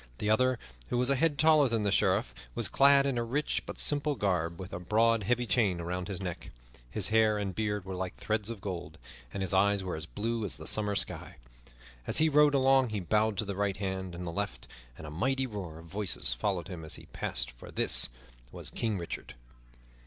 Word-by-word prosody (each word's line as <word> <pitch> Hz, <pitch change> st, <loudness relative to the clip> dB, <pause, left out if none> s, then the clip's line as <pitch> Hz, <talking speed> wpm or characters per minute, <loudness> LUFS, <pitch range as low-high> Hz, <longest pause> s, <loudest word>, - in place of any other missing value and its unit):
The 105 Hz, -, 0 dB
other, 130 Hz, +3 st, +3 dB, 0.3 s
who 120 Hz, -, 0 dB
was 125 Hz, +2 st, +3 dB
a -, -, +4 dB
head 150 Hz, +1 st, +2 dB
taller 155 Hz, -2 st, +5 dB
than 115 Hz, -2 st, 0 dB
the 100 Hz, -, +1 dB
Sheriff, -, -, +2 dB, 0.2 s
was -, -, +4 dB
clad 140 Hz, 0 st, +5 dB
in 135 Hz, -3 st, 0 dB
a -, -, 0 dB
rich 135 Hz, +6 st, -1 dB
but -, -, -6 dB
simple 145 Hz, 0 st, +2 dB
garb, 85 Hz, -6 st, -1 dB
with 95 Hz, -1 st, -8 dB
a 85 Hz, -, -4 dB
broad, 110 Hz, +5 st, +2 dB
heavy 120 Hz, +4 st, +1 dB
chain 105 Hz, -8 st, +1 dB
about 90 Hz, +1 st, -3 dB
his 95 Hz, -3 st, -3 dB
neck. 90 Hz, -3 st, -5 dB, 0.4 s
His 95 Hz, -, +1 dB
hair 110 Hz, -1 st, +4 dB
and 100 Hz, -2 st, -3 dB
beard 105 Hz, -1 st, -2 dB
were 95 Hz, -, -5 dB
like 90 Hz, 0 st, -4 dB
threads 110 Hz, 0 st, -2 dB
of 115 Hz, -4 st, -6 dB
gold, 90 Hz, -4 st, -6 dB, 0.3 s
and 95 Hz, -, -3 dB
his 95 Hz, -, +2 dB
eyes 100 Hz, +1 st, +3 dB
were 90 Hz, -, -3 dB
as 80 Hz, 0 st, -6 dB
blue 115 Hz, +3 st, -2 dB
as 100 Hz, -, -1 dB
the -, -, -10 dB
summer 105 Hz, -1 st, +1 dB
sky. -, -, -1 dB, 0.7 s
As -, -, +2 dB
he 160 Hz, 0 st, +6 dB
rode 150 Hz, -1 st, +5 dB
along 135 Hz, -1 st, +4 dB
he 105 Hz, -1 st, -2 dB
bowed 105 Hz, +3 st, +1 dB
to 110 Hz, -, 0 dB
the 100 Hz, -1 st, -4 dB
right 100 Hz, -1 st, -1 dB
hand 95 Hz, -2 st, -4 dB
and 90 Hz, +1 st, -6 dB
the 85 Hz, -, -3 dB
left, 100 Hz, +4 st, -4 dB, 0.3 s
and -, -, -9 dB
a 75 Hz, -, -7 dB
mighty 130 Hz, -, 0 dB
roar 100 Hz, -9 st, -6 dB
of 85 Hz, -, -12 dB
voices 95 Hz, +2 st, -2 dB
followed 95 Hz, -6 st, -2 dB
him 90 Hz, -4 st, -7 dB
as 80 Hz, -, -7 dB
he -, -, -11 dB
passed; -, -, -3 dB
for -, -, -13 dB
this -, -, +3 dB, 0.4 s
was -, -, -3 dB
King 110 Hz, -3 st, -1 dB
Richard. 85 Hz, -7 st, -6 dB
105 Hz, 220 wpm, -30 LUFS, 90-120 Hz, 0.7 s, he